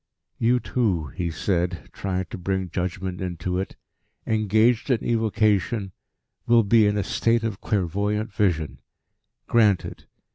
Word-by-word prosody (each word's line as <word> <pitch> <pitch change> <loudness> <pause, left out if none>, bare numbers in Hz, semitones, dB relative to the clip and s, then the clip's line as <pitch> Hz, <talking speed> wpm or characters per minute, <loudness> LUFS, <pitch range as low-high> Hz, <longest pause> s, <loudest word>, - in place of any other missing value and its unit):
"You 120 +2 +3
two," 95 - -1
he 85 -1 -2
said, 90 +1 -2
trying 95 -1 -2
to - - -5
bring 95 -1 -2
judgment 90 +1 -3
into 90 0 -2
it, 95 - -4 0.5
"engaged 110 +3 +2
in 125 -4 +1
evocation, 110 -2 +1 0.6
will 115 -1 +5
be 105 +1 +5
in 105 0 +1
a 100 - 0
state 115 +3 +1
of 110 -3 -3
clairvoyant 105 +2 -1
vision. 85 -7 0 0.6
Granted. 105 -6 +1
100 Hz, 130 wpm, -24 LUFS, 90-110 Hz, 0.6 s, will